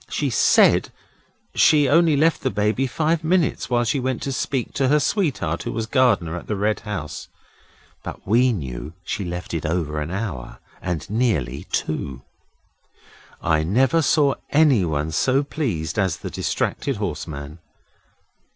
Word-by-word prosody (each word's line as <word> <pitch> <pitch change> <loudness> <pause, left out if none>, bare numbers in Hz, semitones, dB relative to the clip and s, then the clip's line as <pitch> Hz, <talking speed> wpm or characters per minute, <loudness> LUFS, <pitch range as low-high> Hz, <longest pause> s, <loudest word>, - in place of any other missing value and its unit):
She - - -1
SAID - - +4 0.6
she 150 -2 +5
only 160 +2 +4
left 160 +3 +2
the - - 0
Baby 105 +6 0
five 160 +4 0
minutes 170 0 +1
while 120 -1 +2
she 125 +4 0
went 130 -1 -2
to 135 - -2
speak 130 0 -2
to 135 -2 +1
her 150 +3 +4
sweetheart 140 - 0
who - - -4
was 115 0 -2
gardener 110 - +2
at 85 - -7
the 105 - -1
Red 105 +2 0
House. 95 -9 -6 0.7
But - - -8
we 125 +5 +4
knew 75 - -5
she 100 +4 -3
left 90 0 -5
it 80 - -2
over 75 -2 -1
an 75 - -4
hour, 95 - -5 0.2
and 85 -4 -3
nearly 95 - -1
two. 65 -4 -3 1.2
I 80 -2 +2
never 125 - +2
saw 145 -1 +3 0.2
anyone 90 - +2
so 130 - +2
pleased 115 - -3
as 95 -4 +1
the - - -7
distracted - - -2
horseman. 75 +1 -5
105 Hz, 150 wpm, -22 LUFS, -, 1.2 s, she